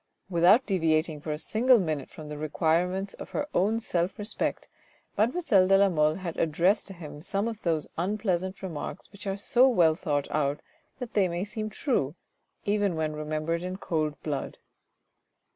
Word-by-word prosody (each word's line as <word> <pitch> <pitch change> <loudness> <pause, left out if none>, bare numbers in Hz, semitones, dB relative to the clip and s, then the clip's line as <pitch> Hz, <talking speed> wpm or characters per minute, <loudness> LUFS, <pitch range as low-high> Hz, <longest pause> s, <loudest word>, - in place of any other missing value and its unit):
Without 185 +9 +5
deviating 160 -5 +1
for 155 - -4
a 150 - -2
single 240 +9 +4
minute 155 -8 -2
from 155 - -10
the 150 0 -6
requirements 175 +5 0
of - - -9
her 290 0 -1
own 215 +5 +2
self 180 -4 -1
respect, 210 +1 -2 0.5
mademoiselle 220 - +3
de 195 0 +6
la 200 0 +5
Mole 155 -3 +2
had 180 -3 -5
addressed 170 +6 +2
to 195 - -8
him 150 -3 -9
some 200 +5 -1
of 225 -2 -5
those 160 -3 0
unpleasant 190 -1 -1
remarks 165 -6 -6
which 200 0 -9
are 195 0 -1
so 250 +6 +4
well 170 -10 +4
thought 150 -4 -1
out 145 -1 0 0.4
that 250 -3 -7
they 200 -3 +3
may 175 +1 -2
seem 215 +1 -4
true, 190 - -1 0.5
even 205 -3 +1
when 155 -1 -1
remembered 155 +2 -2
in 185 +1 -4
cold 155 -6 -2
blood. 145 -3 -3
180 Hz, 170 wpm, -28 LUFS, 155-205 Hz, 0.5 s, de